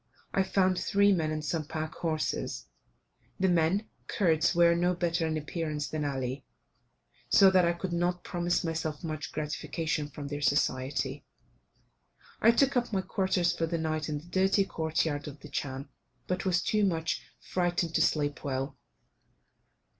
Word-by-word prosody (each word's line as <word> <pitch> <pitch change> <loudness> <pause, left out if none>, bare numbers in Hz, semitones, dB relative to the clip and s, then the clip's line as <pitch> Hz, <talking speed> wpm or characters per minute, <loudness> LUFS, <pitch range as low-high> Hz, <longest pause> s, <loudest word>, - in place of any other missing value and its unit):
I 195 - +3
found 190 -1 +2
three 200 0 +3
men 165 -5 +1
and 155 0 -3
some 160 +1 -1
pack 155 0 -4
horses; 155 - -2 0.7
the 190 - +3
men 175 +4 +2 0.2
(Kurds) 165 -6 +2
were 170 0 +6
no 175 +1 +1
better 170 -1 0
in 155 0 -1
appearance 150 -1 -3
than 155 -1 -3
Ali, 135 -1 -3 0.9
so 195 -1 +7
that 185 -2 +5
I 170 - +2
could 170 +1 -4
not 175 +1 0
promise 175 0 0
myself 160 -1 -3
much 155 -2 -4
gratification 155 0 -2
from 145 +1 -7
their 145 +1 -4
society. 135 0 0 1.2
I 225 - +6
took 270 +4 +4
up 240 -1 +1
my 195 -3 +1
quarters 185 -3 +1
for 165 - -1
the 170 +1 -1
night 155 -1 -2
in 150 - -1
the 150 - -10
dirty 190 +2 +2
court 160 -4 -1
yard 145 -2 -2
of 145 0 -9
the 150 - -10
chan, 135 0 -4 0.4
but 185 +1 -2
was 180 -1 +2
too 215 -1 +1
much 165 -4 0 0.2
frightened 175 -2 -1
to - - +2
sleep 145 -2 +1
well. 135 -1 -3
165 Hz, 160 wpm, -30 LUFS, 150-180 Hz, 1.2 s, so